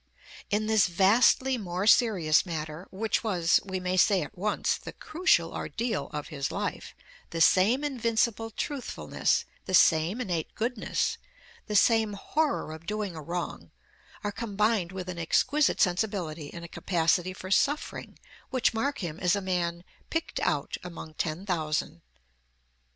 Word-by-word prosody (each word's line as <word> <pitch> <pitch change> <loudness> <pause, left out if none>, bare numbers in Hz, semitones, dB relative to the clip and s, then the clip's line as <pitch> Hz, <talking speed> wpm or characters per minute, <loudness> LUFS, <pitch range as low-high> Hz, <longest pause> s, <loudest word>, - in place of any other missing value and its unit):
In 210 +1 +1
this 220 -3 +4
vastly 230 +8 +4
more 185 -1 -3
serious 195 - +4
matter, 160 0 -5
which 215 +5 -1
was, 180 -7 +3
we 190 -1 -4
may 185 0 -1
say 185 -1 +4
at - - -10
once, 205 +3 0
the - - -9
crucial 310 - +1
ordeal 230 -3 -3
of 150 -1 -5
his 140 -2 -3
life, - - -4 0.3
the 165 - -4
same 205 - +4
invincible 230 -4 0
truthfulness, 270 +4 -1 0.2
the 185 - +2
same 165 +6 +4
innate 175 -9 -3
goodness, 230 0 -1 0.5
the 210 - -3
same 220 0 +4
horror 285 - -1
of 160 +1 -11
doing 210 -4 -3
a 160 - -6
wrong, 170 +3 -5 0.5
are 205 - -1
combined 210 -3 0
with 185 -1 -6
an 180 -2 -5
exquisite 285 - +2
sensibility 175 -6 0
and 170 -1 -8
a - - -8
capacity 175 +1 +1
for 185 0 -8
suffering 290 +9 0 0.3
which 255 -3 +1
mark 250 +1 -1
him 165 0 -5
as 180 +1 +2
a - - 0
man 175 -2 -2 0.3
"picked 325 0 -2
out - - -1
among 170 -3 -8
ten 160 +4 -3
thousand." 155 - -2
190 Hz, 145 wpm, -28 LUFS, 170-225 Hz, 0.5 s, this